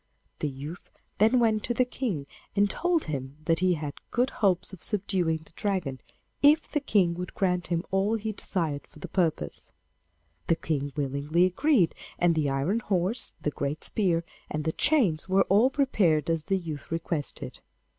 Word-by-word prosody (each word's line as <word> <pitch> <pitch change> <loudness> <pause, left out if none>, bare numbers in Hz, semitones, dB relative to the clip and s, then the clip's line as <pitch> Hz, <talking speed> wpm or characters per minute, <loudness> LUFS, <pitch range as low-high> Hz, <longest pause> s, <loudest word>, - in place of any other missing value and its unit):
The 150 - -1
youth 145 +6 -8 0.3
then 225 +5 +5
went 220 -3 +2
to 240 - -1
the 255 - +3
King 220 - -3 0.3
and 205 0 +4
told 345 - +1
him 140 -2 -5
that 165 0 +2
he 180 -1 +3
had 150 -2 -6
good 250 +2 +1
hopes 190 -2 +1
of 185 - -10
subduing 185 -6 0
the - - -16
Dragon, 180 - -2 0.4
if 300 +2 +5
the 295 - 0
King 200 -11 +2
would 180 +1 -6
grant 180 -3 0
him 170 -1 0
all 195 +3 +2
he 220 0 -2
desired 165 -8 -3
for - - -18
the 150 - -7
purpose. 160 - -1 0.8
The 165 - +4
King 145 -3 -2
willingly 145 +4 +1
agreed, 195 - +3 0.2
and 175 -1 +3
the 155 -3 +1
iron 140 +11 0
horse, 195 +1 0
the 150 - -1
great 145 +2 -3
spear, 175 -6 +1 0.3
and 150 0 -2
the 160 - 0
chains 195 - +2
were 195 +1 +5
all 210 +7 +5
prepared 185 - +2
as 165 -2 -1
the 195 0 +1
youth 160 -5 -6
requested. 165 -2 -3
175 Hz, 175 wpm, -28 LUFS, 155-210 Hz, 0.8 s, then